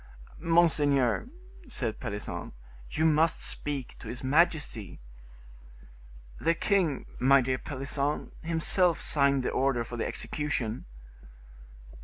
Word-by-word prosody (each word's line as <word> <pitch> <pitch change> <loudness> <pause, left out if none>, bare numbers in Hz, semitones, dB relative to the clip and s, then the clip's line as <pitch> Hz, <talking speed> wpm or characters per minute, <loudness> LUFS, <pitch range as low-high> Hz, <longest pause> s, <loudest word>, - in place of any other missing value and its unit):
"Monseigneur," 155 - +3 0.4
said 120 - -3
Pelisson, 100 -4 -5 0.4
"you 160 - 0
must 160 +1 +3
speak 140 -4 -4
to - - -10
his 125 - -7
majesty." 145 - +1 1.4
"The 165 - +2
king, 175 -7 +1
my 135 +2 +6
dear 130 0 0
Pelisson, 140 +1 -3
himself 165 +1 +2
signed 140 -2 +2
the - - -1
order 135 -3 +1
for 120 +1 -7
the 115 - -1
execution." 130 -6 -3
140 Hz, 105 wpm, -29 LUFS, 125-160 Hz, 1.4 s, my